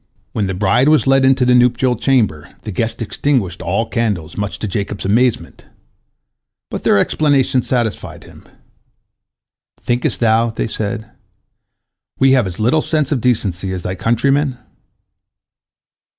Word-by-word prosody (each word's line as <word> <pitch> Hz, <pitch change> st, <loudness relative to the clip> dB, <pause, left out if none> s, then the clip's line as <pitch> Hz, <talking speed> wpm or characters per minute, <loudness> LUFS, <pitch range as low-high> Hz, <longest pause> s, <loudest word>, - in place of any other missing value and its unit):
When 105 Hz, -3 st, -1 dB
the 95 Hz, -, -3 dB
bride 105 Hz, +8 st, +2 dB
was 155 Hz, -1 st, +3 dB
led 135 Hz, 0 st, +3 dB
into 130 Hz, -1 st, +3 dB
the 125 Hz, -, +4 dB
nuptial 125 Hz, +1 st, +3 dB
chamber, 110 Hz, -, 0 dB
the 110 Hz, -, -5 dB
guests 115 Hz, +4 st, -2 dB
extinguished 110 Hz, -7 st, -1 dB
all 95 Hz, +5 st, 0 dB
the -, -, -23 dB
candles, 105 Hz, -10 st, -2 dB
much 105 Hz, -3 st, -4 dB
to 110 Hz, -, -4 dB
Jacob's 100 Hz, 0 st, -4 dB
amazement. 115 Hz, +4 st, 0 dB, 1.1 s
But -, -, -5 dB
their -, -, +3 dB
explanation 135 Hz, +1 st, +2 dB
satisfied 120 Hz, -3 st, -3 dB
him. -, -, -16 dB, 1.3 s
"Thinkest 120 Hz, +1 st, -1 dB
thou," 115 Hz, 0 st, +2 dB
they 110 Hz, -, -3 dB
said, 110 Hz, 0 st, -4 dB, 1.1 s
"we 135 Hz, 0 st, +4 dB
have 130 Hz, -6 st, +3 dB
as 90 Hz, +1 st, -7 dB
little 125 Hz, +8 st, +2 dB
sense 155 Hz, -3 st, -1 dB
of 135 Hz, -5 st, 0 dB
decency 100 Hz, -6 st, -1 dB
as 90 Hz, -2 st, -5 dB
thy 90 Hz, -, -3 dB
countrymen?" 130 Hz, +6 st, 0 dB
115 Hz, 140 wpm, -17 LUFS, 100-130 Hz, 1.3 s, the